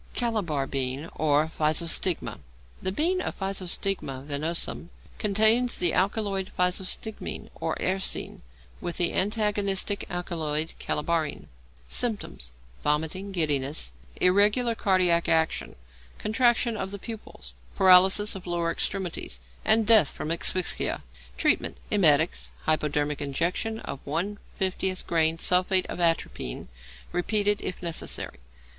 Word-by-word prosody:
=Calabar 200 Hz, -, -1 dB
Bean 135 Hz, +3 st, -3 dB
or 150 Hz, 0 st, +2 dB
Physostigma.= 160 Hz, +2 st, 0 dB, 0.4 s
The 185 Hz, -, 0 dB
bean 350 Hz, -, 0 dB
of -, -, -5 dB
Physostigma 190 Hz, -7 st, -2 dB
venenosum 155 Hz, +3 st, -1 dB, 0.3 s
contains 220 Hz, +4 st, +4 dB
the 175 Hz, -3 st, +6 dB
alkaloid 195 Hz, 0 st, 0 dB
physostigmine 185 Hz, +4 st, -2 dB
or -, -, -3 dB
eserine, 190 Hz, +1 st, -1 dB, 0.4 s
with 175 Hz, -, -4 dB
the 175 Hz, -, +1 dB
antagonistic 205 Hz, -1 st, 0 dB
alkaloid 165 Hz, -4 st, -2 dB
calabarine. 160 Hz, 0 st, -2 dB, 0.4 s
Symptoms. 210 Hz, -, -2 dB, 0.3 s
Vomiting, 160 Hz, +7 st, -1 dB
giddiness, 145 Hz, -, 0 dB, 0.3 s
irregular 205 Hz, +6 st, +4 dB
cardiac 185 Hz, -5 st, +2 dB
action, 160 Hz, -1 st, +1 dB, 0.4 s
contraction 235 Hz, +1 st, +2 dB
of 195 Hz, -, -4 dB
the 200 Hz, -, -5 dB
pupils, 205 Hz, -, -9 dB, 0.2 s
paralysis 190 Hz, +3 st, +6 dB
of 190 Hz, -2 st, -9 dB
lower 170 Hz, -1 st, -1 dB
extremities, 175 Hz, -, -3 dB, 0.2 s
and 220 Hz, 0 st, +4 dB
death 215 Hz, -9 st, +7 dB
from 155 Hz, -, -5 dB
asphyxia. 175 Hz, +2 st, 0 dB, 0.3 s
Treatment. -, -, +1 dB
Emetics; 160 Hz, -5 st, +4 dB
hypodermic 150 Hz, -2 st, 0 dB
injection 175 Hz, +10 st, -1 dB
of 135 Hz, -, -7 dB
1/50 185 Hz, +3 st, -3 dB
grain 160 Hz, -1 st, +2 dB
sulphate 180 Hz, +2 st, +2 dB
of -, -, -6 dB
atropine, 165 Hz, -, 0 dB, 0.4 s
repeated 205 Hz, +3 st, +1 dB
if 180 Hz, -, -5 dB
necessary. 165 Hz, -, -4 dB
180 Hz, 105 wpm, -26 LUFS, 155-205 Hz, 0.4 s, death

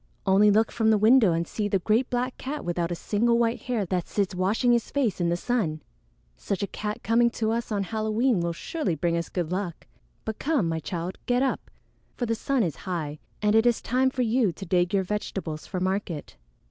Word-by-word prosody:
Only 200 Hz, +2 st, +5 dB
look 220 Hz, +2 st, +3 dB
from 225 Hz, -1 st, +1 dB
the 220 Hz, -, +5 dB
window 220 Hz, -1 st, +6 dB
and 165 Hz, +1 st, -1 dB
see 210 Hz, -2 st, -2 dB
the 200 Hz, -, +2 dB
great 220 Hz, +7 st, +1 dB
black 250 Hz, +1 st, -1 dB
cat 295 Hz, +3 st, -5 dB
without 175 Hz, 0 st, -1 dB
a -, -, -1 dB
single 230 Hz, +7 st, +1 dB
white 235 Hz, 0 st, +1 dB
hair 235 Hz, -5 st, -1 dB
that 180 Hz, -1 st, -2 dB
sits 200 Hz, -2 st, -1 dB
washing 200 Hz, +7 st, +2 dB
his 235 Hz, -1 st, +2 dB
face 240 Hz, -10 st, 0 dB
in 170 Hz, -, +2 dB
the 170 Hz, -, +1 dB
sun. 175 Hz, -, -1 dB, 0.5 s
Such 200 Hz, -, -3 dB
a 200 Hz, -, -5 dB
cat 210 Hz, 0 st, -4 dB
coming 235 Hz, +1 st, +4 dB
to 220 Hz, -1 st, -1 dB
us 235 Hz, 0 st, -2 dB
on 200 Hz, -2 st, 0 dB
Halloween 220 Hz, +2 st, +1 dB
will 170 Hz, 0 st, 0 dB
surely 185 Hz, -, -2 dB
bring 170 Hz, +2 st, 0 dB
us 170 Hz, 0 st, -2 dB
good 175 Hz, -3 st, -3 dB
luck! 180 Hz, -3 st, -3 dB, 0.4 s
But 220 Hz, -, -4 dB
come, 285 Hz, -, +1 dB
my 165 Hz, 0 st, -1 dB
child, 175 Hz, +3 st, -5 dB
get 245 Hz, +1 st, +2 dB
up, 270 Hz, -, -2 dB, 0.5 s
for 245 Hz, -, -2 dB
the 230 Hz, -, 0 dB
sun 255 Hz, +2 st, 0 dB
is 165 Hz, -6 st, -2 dB
high, 155 Hz, -5 st, -3 dB, 0.2 s
and 210 Hz, 0 st, +3 dB
it 225 Hz, +2 st, +5 dB
is 240 Hz, -, +3 dB
time 260 Hz, +2 st, +1 dB
for 260 Hz, -1 st, -1 dB
you 230 Hz, -3 st, +2 dB
to 195 Hz, +4 st, -9 dB
dig 175 Hz, 0 st, +2 dB
your 195 Hz, -2 st, +2 dB
vegetables 185 Hz, -5 st, -4 dB
for 185 Hz, -, -3 dB
market." 185 Hz, -4 st, -2 dB
210 Hz, 220 wpm, -26 LUFS, 175-235 Hz, 0.5 s, window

